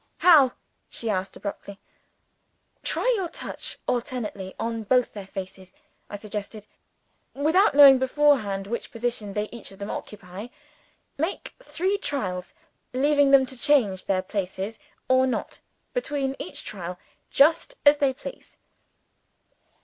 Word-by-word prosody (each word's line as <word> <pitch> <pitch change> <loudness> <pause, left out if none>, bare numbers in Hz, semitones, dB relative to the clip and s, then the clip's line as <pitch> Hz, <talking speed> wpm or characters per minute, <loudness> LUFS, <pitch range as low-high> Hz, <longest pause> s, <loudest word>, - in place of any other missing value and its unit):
"How?" 295 -8 +6 0.4
she 230 -2 -2
asked 190 -1 -2
abruptly. 200 -1 -7 1.0
"Try - - +1
your 375 -5 -2
touch - - -5
alternately 225 -6 -3
on 230 0 -2
both 250 +3 +2
their 200 -2 -8
faces," 190 -1 -8 0.4
I - - -6
suggested, 210 0 -6 0.7
"without 320 +7 +3
knowing 275 -2 +9
beforehand 260 -8 +2
which 235 +4 -4
position 230 -3 -3
they 210 +1 -1
each 235 -2 -8
of 195 - -14
them 200 0 -5
occupy. 195 +1 -7 0.7
Make 330 +6 -3
three 390 -3 -1
trials 185 - -4 0.4
leaving 285 +2 +3
them 275 -1 +6
to 260 - -7
change 240 -9 +2
their 185 -1 0
places 195 +2 -4 0.3
or 260 0 +4
not, 255 - -3 0.3
between 285 - -2
each 185 - -6
trial, 180 -3 -6 0.3
just 325 - +3
as 290 +1 +7
they 280 -2 +2
please. - - -10
240 Hz, 125 wpm, -25 LUFS, 200-285 Hz, 1.0 s, knowing